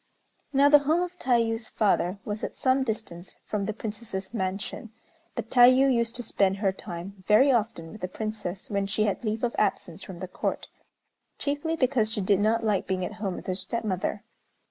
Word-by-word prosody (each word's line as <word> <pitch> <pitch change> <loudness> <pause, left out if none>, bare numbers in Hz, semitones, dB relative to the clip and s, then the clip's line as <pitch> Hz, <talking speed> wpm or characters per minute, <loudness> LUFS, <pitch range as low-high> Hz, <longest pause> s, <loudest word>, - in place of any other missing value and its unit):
Now, 275 +1 +5
the 295 0 +8
home 315 +5 +2
of 360 0 -7
Tayû's 230 -2 +1
father 195 -3 +1
was 210 0 -4
at - - -4
some 265 -1 +2
distance 215 -7 -5
from 205 -2 -2
the - - 0
Princess's 210 -2 -6
mansion; 195 +2 -3 0.4
but 230 -2 -5
Tayû 255 +2 +7
used 235 0 0
to 245 - -4
spend 195 -3 +1
her 195 -1 +1
time 190 0 -8
very 260 +7 +6
often 220 -9 -1
with 215 - -11
the 185 - -1
Princess, 210 -2 -5
when 200 -1 -1
she 215 +1 0
had 210 +2 -1
leave 220 +1 -2
of 240 - 0
absence 170 +1 -1
from 190 -2 -8
the 185 +1 -6
Court, 185 - -3 0.7
chiefly 290 +3 -1
because 255 -7 +1
she 225 - -2
did 195 0 +3
not 225 +2 +2
like 210 -3 +1
being 185 -1 -1
at 215 - -5
home 195 -4 -1
with - - -8
her 185 - -1
stepmother. 200 0 -2
215 Hz, 190 wpm, -27 LUFS, 195-245 Hz, 0.7 s, the